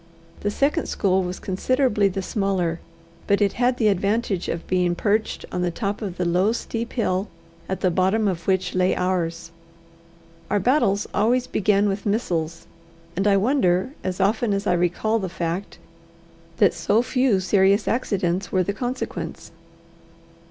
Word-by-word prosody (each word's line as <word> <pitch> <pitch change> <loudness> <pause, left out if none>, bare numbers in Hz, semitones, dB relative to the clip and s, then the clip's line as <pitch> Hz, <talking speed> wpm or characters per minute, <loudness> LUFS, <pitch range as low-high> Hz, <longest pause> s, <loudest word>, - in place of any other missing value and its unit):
The 205 - -1
second 285 +9 0
school 190 -2 +1
was 180 0 -4
considerably 210 +2 +1
the 195 0 -3
smaller, 185 -5 -1 0.5
but 200 - +3
it 205 -2 +2
had 245 +1 +1
the 220 - +2
advantage 200 0 0
of 170 - -3
being 180 -1 +1
perched 215 +3 0
on 180 - -2
the 180 - +1
top 200 +4 -3
of 190 -4 -5
the 180 - -1
low, 180 +5 +2
steep 235 0 -4
hill 195 -4 0 0.4
at 190 -1 -3
the 185 - +2
bottom 190 +5 +2
of 170 -4 -3
which 190 -1 +1
lay 185 0 +2
ours. 170 -2 -2 1.0
Our 205 - +2
battles 205 -3 +2
always 240 +4 +2
began 205 -2 +2
with 200 +1 -2
missiles; 170 -7 -1 0.5
and 195 +3 +1
I 200 -1 +5
wonder, 200 -2 +2
as 185 0 -3
often 205 +2 +1
as 200 +1 -3
I 180 - +2
recall 180 +6 +1
the 190 -3 -3
fact, 170 +2 -4 0.8
that 200 -4 +4
so 200 +7 +1
few 250 -5 +2
serious 195 +2 +3
accidents 195 -6 -1
were 185 -1 +2
the 200 +3 -2
consequence. 250 +4 -5
195 Hz, 160 wpm, -23 LUFS, 180-215 Hz, 1.0 s, I